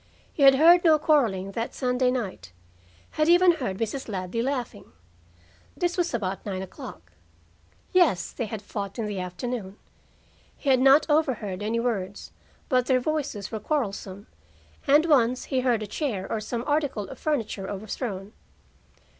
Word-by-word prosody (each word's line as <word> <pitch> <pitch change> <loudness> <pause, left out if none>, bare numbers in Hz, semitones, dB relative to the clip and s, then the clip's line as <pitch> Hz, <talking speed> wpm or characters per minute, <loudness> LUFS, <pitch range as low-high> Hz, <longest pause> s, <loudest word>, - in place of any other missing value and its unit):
He - - -5
had 270 -1 +8
heard 340 +5 +6
no 320 -3 +6
quarreling 230 - +1
that 230 +3 -4
Sunday 250 -1 +1
night; 195 - -4 0.6
had 305 +1 +1
even 350 +1 +7
heard 250 - -3
Mrs. 230 +4 -3
Ladley 190 +3 -3
laughing. 250 - -4 0.8
This 350 0 0
was 350 -2 0
about 195 -4 -3
nine 190 -2 -4
o'clock. 85 - -10 0.8
Yes, 315 - +3
they 235 - -4
had 215 -1 -6
fought 200 -1 -5
in 225 - -2
the 205 -2 -4
afternoon. 190 +3 -5 0.8
He 280 - 0
had 260 - +4
not 270 +3 +6
overheard 255 - 0
any 220 +3 -1
words, 205 -5 -3 0.4
but 250 -2 +2
their 260 -1 +3
voices 260 -8 -3
were 220 - -3
quarrelsome, 205 -7 -3 0.6
and 295 +3 +5
once 255 -6 +3
he 265 - -1
heard 245 -4 +1
a - - -3
chair 210 - -3
or 220 - 0
some 230 +2 -4
article 290 -9 -1
of 265 - -10
furniture 225 -10 -2
overthrown. 205 0 -5
235 Hz, 155 wpm, -26 LUFS, 200-280 Hz, 0.8 s, had